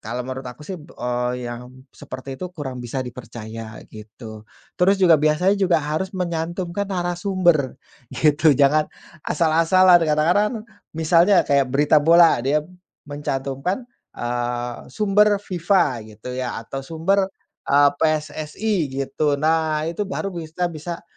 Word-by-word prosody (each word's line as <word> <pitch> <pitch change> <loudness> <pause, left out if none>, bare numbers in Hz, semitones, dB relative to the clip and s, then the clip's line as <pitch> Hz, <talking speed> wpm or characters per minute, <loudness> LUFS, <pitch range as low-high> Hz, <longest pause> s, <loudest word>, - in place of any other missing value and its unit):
kalau 120 +3 -4
menurut 130 0 -6
aku, 125 +5 -11
sih, 190 - -6
eee, 125 -4 -3
yang 120 +1 -7 0.2
seperti 130 +1 -9
itu 180 - -4
kurang 130 -4 -5
bisa 120 +2 -5
dipercaya, 115 -2 -9
gitu. 110 0 -11 0.3
Terus 195 +3 +4
juga 180 -3 +5
biasanya 155 +6 +3
juga 185 -3 +3
harus 155 +5 -2
menyantumkan 175 +2 -3
narasumber, 175 -5 0 0.3
gitu. 150 +2 +3
Jangan 150 +2 +3 0.4
asal-asalan, 175 +3 +4
kadang-kadang 170 +8 +2
kan - - -26
misalnya 170 +4 +4
kayak 140 -1 +2
berita 145 +3 +3
bola, 165 +2 +6
dia 150 +3 +1 0.4
mencantumkan, 145 - -3 0.3
eee, 120 0 -3 0.2
sumber 210 +4 +3
FIFA, 175 - 0 0.2
gitu, 125 +4 -8
ya, 125 -2 -3
atau 135 +4 -6
sumber, 180 +7 0 0.4
eee, 145 0 +5
PSSI, 155 +6 -1 0.2
gitu. 140 +2 0
Nah, 155 0 +1
itu 200 +4 -3
baru 195 +1 -3
bisa 170 0 -4
bisa 165 +2 -7
155 Hz, 130 wpm, -22 LUFS, 130-175 Hz, 0.4 s, bola